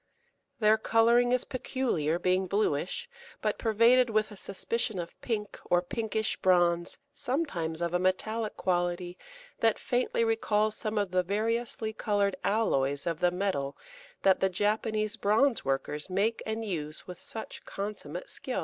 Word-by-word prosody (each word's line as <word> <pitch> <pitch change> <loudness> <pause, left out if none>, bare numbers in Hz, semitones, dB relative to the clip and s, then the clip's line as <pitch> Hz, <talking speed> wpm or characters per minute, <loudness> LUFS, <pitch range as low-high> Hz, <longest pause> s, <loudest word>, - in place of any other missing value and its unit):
Their 215 0 +5
colour 230 +2 +4
is 245 0 +2
peculiar, 235 - -1
being 185 +1 +1
bluish, 200 - 0 0.3
but - - -1
pervaded 235 +3 +4
with 215 -1 +1
a - - -8
suspicion 210 +2 -2
of 170 -1 -5
pink 210 -4 -3
or 175 - +3
pinkish 220 +2 -1
bronze, 175 -2 +3 0.2
sometimes 245 - -2
of 170 0 -1
a 180 - +2
metallic 215 +4 -1
quality 175 -1 -1 0.4
that 225 -1 +3
faintly 245 -1 0
recalls 215 -1 +1
some 215 0 -3
of 200 -3 0
the 185 0 +3
variously 220 +3 -1
coloured 205 -2 +1
alloys 140 -10 +1
of 165 0 -2
metal 180 -7 -2 0.5
that 190 -1 +5
the 190 - +2
Japanese 215 +3 0
bronze 230 +6 +3
workers 135 +4 -2
make 205 +5 +1
and 220 +1 -2
use 155 -6 -4
with 180 -1 -9
such 220 - -7
consummate 195 -5 -5
skill. 260 - -4
210 Hz, 140 wpm, -29 LUFS, 180-225 Hz, 0.5 s, Their